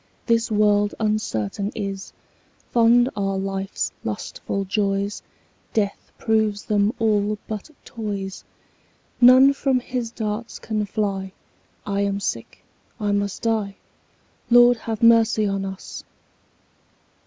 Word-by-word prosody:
This 230 -1 +2
world 205 -1 +2
uncertain 205 - -1
is: 195 -3 -5 0.6
Fond 240 +1 +5
are 195 -1 -1
life's 195 0 -3
lustful 195 - -4
joys, 200 0 -1 0.5
Death 205 -2 -1
proves 220 -2 0
them 205 0 +2
all 210 -1 +1
but 215 +5 -6 0.2
toys. 200 -4 -5 0.8
None 255 +3 +8
from 270 -2 +1
his 245 -1 -4
darts 220 0 -4
can 215 -2 -3
fly; 195 -2 -2 0.5
5 200 - -3
I - - +1
am 200 0 0
sick, 115 - -5 0.3
I 205 -1 0
must 200 +1 -2
die— 215 -3 0 0.7
Lord, 240 0 +7
have 225 0 -5
mercy 225 -2 +5
on 195 -1 -1
us! 190 0 -7
210 Hz, 115 wpm, -23 LUFS, 200-225 Hz, 0.8 s, None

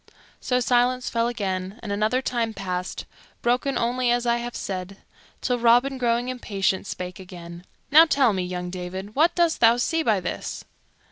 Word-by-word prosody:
So 250 -1 0
silence 250 +1 +1
fell 230 0 +1
again 195 -2 -3
and 210 - -5
another 215 +6 +1
time 230 -3 -1
passed, 180 -1 -4 0.4
broken 250 +3 +1
only 245 +1 0
as 240 0 +1
I 235 0 +2
have 240 0 -5
said, 190 0 -5 0.4
till 250 -1 0
Robin, 245 +3 +3
growing 240 0 +1
impatient, 200 -6 -1
spake 180 -1 -6
again. 175 -1 -10 0.3
"Now 315 +3 +9
tell 275 -8 +3
me, 190 - -1
young 180 0 -4
David, 185 +3 -6
what 320 +7 +3
dost 340 -2 +2
thou 230 0 +6
see 325 +7 0
by 220 -10 +2
this?" 180 - -5
235 Hz, 165 wpm, -24 LUFS, 190-250 Hz, 0.4 s, Now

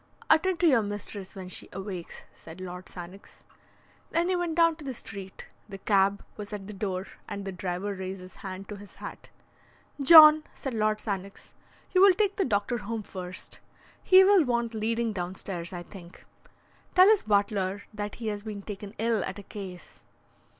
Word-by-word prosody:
"Attend 335 +3 +3
to - - +4
your 260 -7 +5
mistress 205 -1 -6
when 190 -2 -7
she 185 - -6
awakes," 190 -2 -7
said 160 +3 -13
Lord 180 0 -7
Sannox. 180 +2 -11 0.7
Then 340 +2 +1
he 370 - +2
went 350 -2 -1
down 335 -1 +4
to 310 - -11
the 265 -3 -5
street. 195 -3 -8 0.2
The 195 - -7
cab 195 0 +2
was 210 -1 -7
at 205 -2 -6
the 210 - -8
door, 190 -2 -3 0.2
and 200 -1 -5
the 195 - -3
driver 185 +2 -3
raised 190 0 -6
his 185 0 -13
hand 190 0 -7
to 210 - -6
his 200 0 -13
hat. - - -9 0.7
"John," 305 +1 +10
said 270 -3 -5
Lord 215 -1 +1
Sannox, 200 -2 -5 0.4
"you 370 - +4
will 390 -2 +8
take 405 0 +1
the 390 - +2
doctor 215 +2 0
home 220 +1 -4
first. 185 -2 -8 0.4
He 375 0 +7
will 390 -2 +6
want 235 -3 -1
leading 225 +1 -1
downstairs, 180 -1 -5
I 175 -1 -6
think. 175 -1 -13 0.7
Tell 370 +1 +8
his 430 -1 +5
butler 200 -2 0
that 210 0 -5
he 225 -2 -4
has 205 -1 -4
been 205 -2 -7
taken 205 0 -8
ill 225 -1 +1
at 190 - -5
a 205 - -9
case." 185 -4 -9
205 Hz, 180 wpm, -28 LUFS, 190-240 Hz, 0.7 s, John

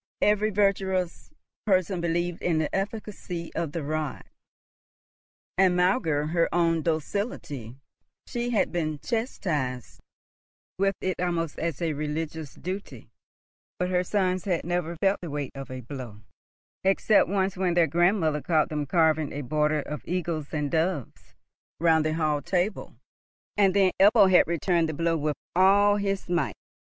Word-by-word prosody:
Every 210 +1 +3
virtuous 190 -3 0 0.4
person 185 -2 +2
believed 170 +1 -1
in 170 -3 +1
the 155 -1 -1
efficacy 195 -4 -4
of 165 -3 -2
the 165 0 -4
rod, 155 -1 -3 1.4
and, 185 -2 +5
maugre 180 - +2
her 170 -1 +2
own 165 -1 +2
docility, 155 - -3 0.5
she 240 -1 -3
had 230 -4 +1
been 155 -3 -1
chastised 150 - -3 0.8
with 195 0 +2
it 185 -1 -2
almost 170 -3 -1
as 165 -2 -2
a 160 -2 0
religious 150 0 -4
duty; 190 +4 -7 0.7
but 180 0 -1
her 180 0 +2
sons 185 -2 0
had 180 -4 0
never 175 -1 -1
felt 195 +4 +1
the 175 - -6
weight 145 -2 -4
of 135 -2 -8
a 130 0 -6
blow, 120 -4 -8 0.6
except 195 0 +3
once 195 -1 0
when 180 -2 0
their 170 -1 +5
grandmother 165 -1 +2
caught 155 -1 +2
them 150 -2 -3
carving 160 -2 +2
a 145 - -4
border 150 +2 +1
of 150 - -6
eagles 170 -4 -3
and 150 -2 -2
doves 160 -5 -2 0.4
round 160 -1 +4
the 155 0 0
hall 155 -3 0
table, 185 +4 -2 0.6
and 195 -2 +3
then 195 -2 +4
Ebbo 200 -1 +6
had 180 - +6
returned 170 0 +1
the 155 - -4
blow 165 +1 +1
with 150 -1 -1 0.2
all 200 +2 +5
his 195 -1 -2
might. 170 -5 0
170 Hz, 145 wpm, -26 LUFS, 155-190 Hz, 1.4 s, Ebbo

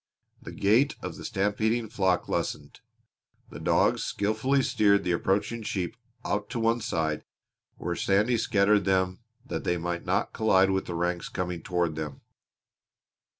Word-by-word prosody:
The - - -8
gait 120 +9 +3
of - - -5
the - - -10
stampeding 110 +4 0
flock 95 -3 +1
lessened. - - -3 0.7
The - - -8
dogs - - +2
skilfully 110 +7 +1
steered 100 -4 +3
the 90 - 0
approaching 100 +6 0
sheep 100 -1 -3 0.3
out 105 0 -1
to 120 - -3
one 115 +1 +2
side 80 -7 -1 0.5
where - - -3
Sandy 105 +5 +2
scattered 100 -2 +3
them 95 -1 +1 0.3
that - - -4
they 90 - 0
might 85 0 -3
not 95 +5 0
collide 95 -3 +4
with 95 0 -1
the 85 - -4
ranks 90 +1 -1
coming 90 -2 -3
toward 85 -3 -1
them. 75 -3 -5
100 Hz, 150 wpm, -27 LUFS, 90-110 Hz, 0.7 s, collide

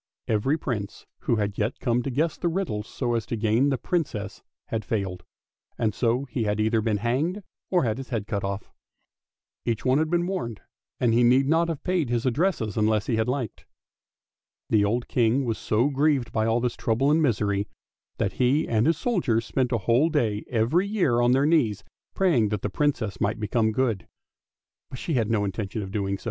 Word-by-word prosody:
Every 115 +8 +1
Prince 110 -10 -4 0.2
who - - +3
had 105 -2 -2
yet 110 +4 -1
come 120 0 +1
to 130 - -3
guess 155 +5 0
the 175 - -2
riddles 165 - -2
so 120 -3 -2
as 115 -1 0
to 115 - -2
gain 110 +6 +2
the 135 - +1
Princess 120 - -3 0.3
had 110 -1 -2
failed, 95 -4 -3 0.5
and 110 -3 0
so 125 +4 0
he 120 -3 -2
had 105 0 0
either 110 +1 +2
been 110 -1 0
hanged 145 - -1 0.3
or 180 -4 +2
had 115 0 -1
his 135 - -7
head 115 -5 -2
cut 100 -2 -3
off. 100 +1 -4 0.9
Each 115 -2 -2
one 130 +2 +4
had 155 0 +1
been 175 +1 +1
warned, 175 - -3 0.4
and 120 -3 +2
he 120 - +4
need 130 +3 +4
not 165 +3 +3
have 160 -4 -4
paid 180 -8 0
his 120 0 0
addresses 130 - 0
unless 110 0 +2
he 115 - 0
had 110 - +1
liked. 125 -4 -3 1.0
The 105 -2 +4
old 115 +4 0
King 120 +3 +2
was 115 -2 -2
so 115 +6 +1
grieved 140 -3 +1
by 110 0 0
all 115 +1 +2
this 125 -1 -1
trouble 125 +6 +1
and 160 +2 +3
misery 105 -7 +1 0.5
that - - -1
he 130 +4 +2
and 115 +3 +2
his 165 -1 +3
soldiers 150 - 0
spent 130 0 0
a 120 - +2
whole 120 - +2
day 115 -9 0
every 125 - +2
year 175 - +2
on 120 0 +4
their 135 +2 +3
knees 120 - +2 0.3
praying 150 - +3
that 105 -2 -3
the 105 - -2
Princess 115 -8 -1
might 105 +2 0
become 110 +1 +1
good. 115 -5 -1 0.8
But 130 - -7
she 165 - -3
had 115 -5 +1
no 105 -3 +1
intention 100 +2 -3
of 95 - -7
so - - -11
doing. 100 -2 -1
120 Hz, 205 wpm, -25 LUFS, 110-140 Hz, 1.0 s, one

